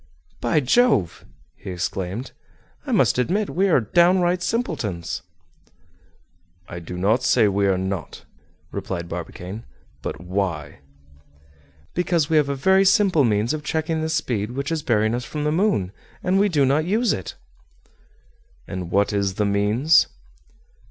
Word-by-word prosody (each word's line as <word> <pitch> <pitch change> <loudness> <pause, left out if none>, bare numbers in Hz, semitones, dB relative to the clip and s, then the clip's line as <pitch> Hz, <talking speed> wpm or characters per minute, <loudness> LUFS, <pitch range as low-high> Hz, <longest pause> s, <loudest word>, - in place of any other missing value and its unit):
"By 120 +6 +1
Jove!" 135 - +2 0.3
he - - -10
exclaimed, 95 +6 -4 0.6
"I - - -2
must - - +3
admit 195 +11 0
we 195 +2 +1
are 165 - +5
down 175 - +3
right 175 0 +1
simpletons!" 140 - -2 1.5
"I 85 - -7
do 85 +1 -8
not 105 +7 +2
say 125 -3 +3
we 100 0 +1
are 95 -1 +2
not," 95 -2 -5 0.5
replied 95 -3 -4
Barbicane; 90 +5 -7 0.4
"but - - -5
why?" 90 -5 -3 1.1
"Because 170 -3 0
we 160 - +4
have 145 -2 +3
a 140 - -1
very 190 +8 +4
simple 195 -5 +4
means 110 +1 +1
of 155 -1 -4
checking 160 +1 -1
this 160 0 -1
speed 110 -1 -2
which 140 +4 -3
is 160 -2 -1
bearing 110 -4 +1
us 120 +1 -2
from 150 +4 -5
the 150 - +1
moon, 160 - +1 0.3
and 185 +2 +2
we 205 +1 +3
do 145 -6 +2
not 140 +4 +2
use 220 +5 +1
it!" 95 - -6 1.3
"And 90 -2 -5
what 100 +3 +1
is 100 -2 0
the 105 - 0
means?" 105 +9 +3
125 Hz, 150 wpm, -22 LUFS, -, 1.5 s, are